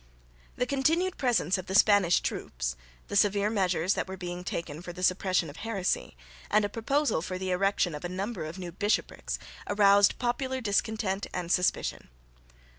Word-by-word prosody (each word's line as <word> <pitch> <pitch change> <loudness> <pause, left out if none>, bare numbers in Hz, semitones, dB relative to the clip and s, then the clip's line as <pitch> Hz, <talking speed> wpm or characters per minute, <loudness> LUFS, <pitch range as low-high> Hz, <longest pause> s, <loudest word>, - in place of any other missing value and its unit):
The 250 - 0
continued 320 +8 +1
presence 220 - +2
of 185 - -8
the 190 - -2
Spanish 205 -4 +5
troops, - - -3 0.3
the - - -5
severe 205 0 +3
measures 185 -3 +1
that - - -2
were 190 0 -6
being 180 -1 -5
taken 165 -3 -4
for 175 - -7
the 180 +1 -8
suppression 185 -1 +2
of 145 +2 -10
heresy, 195 - -2 0.3
and 210 0 +3
a - - -2
proposal 275 - 0
for 185 +2 -4
the 185 0 -3
erection 190 -2 +1
of 150 - -7
a 175 - -3
number 190 0 -4
of 155 +4 -7
new 180 -2 -6
bishoprics, 205 +4 -1 0.3
aroused 200 0 +5
popular 260 +1 -1
discontent 205 -2 -1
and 175 -2 -3
suspicion. 180 -1 0
195 Hz, 170 wpm, -29 LUFS, 180-215 Hz, 0.3 s, Spanish